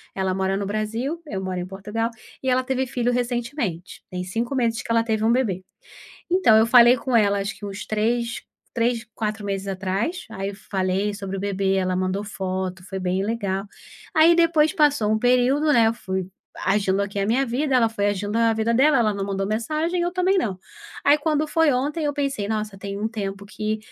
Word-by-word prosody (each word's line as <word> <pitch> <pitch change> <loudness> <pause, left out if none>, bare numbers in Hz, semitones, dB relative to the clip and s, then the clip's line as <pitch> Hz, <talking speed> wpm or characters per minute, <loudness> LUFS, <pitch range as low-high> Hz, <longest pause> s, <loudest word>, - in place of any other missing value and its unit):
Ela 190 -1 0
mora 190 0 0
no 200 - -2
Brasil, 225 +10 -2
eu 195 -8 -4
moro 185 -1 -3
em 180 - -3
Portugal, 210 +5 -3 0.3
e 260 - 0
ela 255 0 +2
teve 265 0 -1
filho 245 0 0
recentemente. 240 - -3
Tem 180 0 -4
5 230 +8 -3
meses 230 -2 0
que - - -12
ela 230 0 +3
teve 220 -1 -1
um 230 - +4
bebê. 200 -8 0 0.7
Então 360 -11 +5
eu 220 - +5
falei 240 +1 +7
com 255 0 -1
ela 205 -3 +4
acho 200 +1 -3
que 205 - -8
uns 200 0 -6
3- 235 +2 -1 0.3
3, 235 0 0
4 215 -1 -3
meses 195 0 -3
atrás. 195 - -2
Aí 195 +1 -3
eu 200 - -8
falei 190 +1 -1
sobre 195 -1 -5
o - - -3
bebê, 195 -1 0
ela 185 -1 0
mandou 185 +2 -1
foto, 190 -2 -4
foi 190 +1 -6
bem 185 +1 -1
legal. 200 -3 -2 0.5
Aí 320 +2 +7
depois 325 -2 +4
passou 285 -8 +3
um 220 - +3
período, 255 +5 +3
né, 230 -1 +5
eu 225 - +2
fui 190 -5 -4 0.4
agindo 195 0 +2
aqui 200 0 -4
a 195 - +1
minha 250 +6 +2
vida, 260 +3 0
ela 235 -2 +4
foi 205 -2 -1
agindo 205 +1 -2
a 230 -1 +4
vida 225 +1 0
dela, 285 +5 +4
ela 215 -3 +2
não 200 -1 -3
mandou 195 0 -2
mensagem, 310 +11 -1
eu 350 0 0
também 370 +2 +2
não. 195 - -2 0.5
Aí 285 - +6
quando 305 0 0
foi 320 -1 +3
ontem, 290 +5 -1
eu 290 - 0
pensei: 275 -8 -2
"Nossa, 215 -2 -2
tem 200 0 -6
um 220 - 0
tempo 200 -3 -5
que 215 +1 -3
220 Hz, 210 wpm, -23 LUFS, 195-250 Hz, 0.7 s, falei